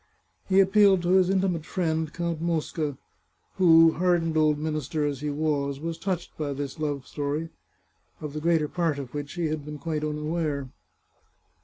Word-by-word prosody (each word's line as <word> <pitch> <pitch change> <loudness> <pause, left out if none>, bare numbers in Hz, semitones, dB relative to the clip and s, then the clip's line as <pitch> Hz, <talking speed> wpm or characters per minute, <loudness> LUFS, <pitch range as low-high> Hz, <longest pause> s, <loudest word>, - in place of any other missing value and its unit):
He 190 0 +5
appealed 195 -1 +5
to 175 - 0
his 185 0 +4
intimate 190 -4 +1
friend, 160 -3 -1
Count 170 -2 -3
Mosca, 160 -3 -2 0.6
who, 165 -3 +7
hardened 170 -2 +1
old 155 -1 +3
minister 155 0 -2
as 145 -2 -3
he 150 - -2
was, 145 -2 -1
was 165 +1 -4
touched 185 -3 -3
by 145 -2 -2
this 140 +2 -5
love 145 -4 -2
story, 150 +4 -3 0.7
of 150 -2 -6
the 155 - -4
greater 165 -2 +2
part 165 -2 -1
of 135 -3 -7
which 145 -1 -5
he 175 -1 -2
had 155 -1 -3
been 150 +1 -7
quite 155 0 -3
un 150 0 -2
aware. 150 -3 -2
155 Hz, 170 wpm, -26 LUFS, 150-170 Hz, 0.7 s, who